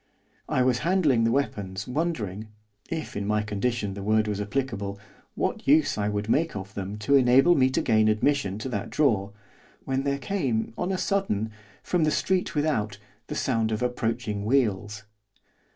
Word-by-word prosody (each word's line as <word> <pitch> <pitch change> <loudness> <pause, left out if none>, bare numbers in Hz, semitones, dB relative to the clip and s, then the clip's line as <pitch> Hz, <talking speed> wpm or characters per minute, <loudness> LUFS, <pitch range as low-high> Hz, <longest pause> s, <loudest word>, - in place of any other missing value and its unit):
I 130 - +2
was 125 -1 +2
handling 150 -7 +2
the 115 - +2
weapons, 105 -7 -2
wondering 125 - -2 0.4
if, 160 -2 -4
in 100 0 -3
my 105 0 +1
condition, 105 0 -2
the 100 - -7
word 110 +1 +2
was 105 -1 -2
applicable 100 -3 -3 0.4
what - - -2
use 150 +2 +4
I 105 -1 -1
could 105 0 -2
make 160 +6 +1
of 100 -1 -6
them 100 +1 -5
to 105 +7 0
enable 135 +5 +6
me 130 -4 +4
to 130 - 0
gain 110 0 +3
admission 110 -2 +1
to 110 +5 -5
that 105 -4 -3
drawer, 105 -9 +1 0.5
when 135 0 0
there 140 0 0
came, 130 - -1
on 180 +2 -2
a 190 - 0
sudden, 185 - 0 0.3
from 180 -3 +1
the 155 - +3
street 185 +3 0
without, 125 -10 0 0.3
the - - -5
sound 110 -1 0
of 110 +2 -1
approaching 115 -4 -2
wheels. 105 -3 0
115 Hz, 170 wpm, -26 LUFS, 105-140 Hz, 0.5 s, enable